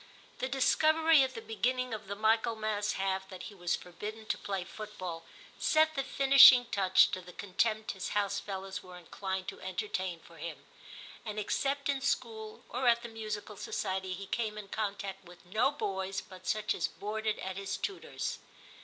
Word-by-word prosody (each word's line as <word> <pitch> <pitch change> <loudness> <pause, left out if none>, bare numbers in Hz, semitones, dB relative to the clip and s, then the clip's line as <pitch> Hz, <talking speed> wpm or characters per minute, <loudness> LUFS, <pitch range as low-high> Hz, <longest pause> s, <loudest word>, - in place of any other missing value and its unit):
The 260 - -1
discovery 315 +4 +5
at 260 -1 0
the 225 - -6
beginning 250 +3 0
of 215 -2 -6
the 200 - -3
Michaelmas 215 -1 +1
half 190 0 -1
that 185 -2 -8
he - - -8
was 175 -3 0
forbidden 210 +5 -7
to - - +1
play 195 -2 -3
football, 185 -4 -7 0.3
set 315 0 +4
the 275 - 0
finishing 270 -2 +8
touch 190 -4 +4
to 185 - -3
the 180 0 -12
contempt 215 +3 0
his 190 - -5
house 200 -1 +1
fellows 195 -1 -5
were 180 -1 -11
inclined 190 +2 -4
to - - -10
entertain 185 -2 -3
for 165 0 -16
him, 150 -3 -7 0.6
and 215 -2 -5
except 275 +6 0
in 280 -1 0
school 220 -4 -2
or 250 +1 -1
at 235 0 +5
the 235 - -6
musical 215 -1 -5
society 190 -2 -2
he 195 +2 -6
came 215 +1 -2
in 205 -2 -8
contact 200 -2 -3
with 175 0 -14
I20 - - -25
TIM 180 - -22
CHAP, 215 - 0
no - - +5
boys 195 -7 -2
but 185 -1 -13
such 215 0 +1
as - - 0
boarded 215 +1 -3
at 190 0 -5
his 200 0 -3
tutor's. 395 - -4
210 Hz, 185 wpm, -32 LUFS, 190-230 Hz, 0.6 s, finishing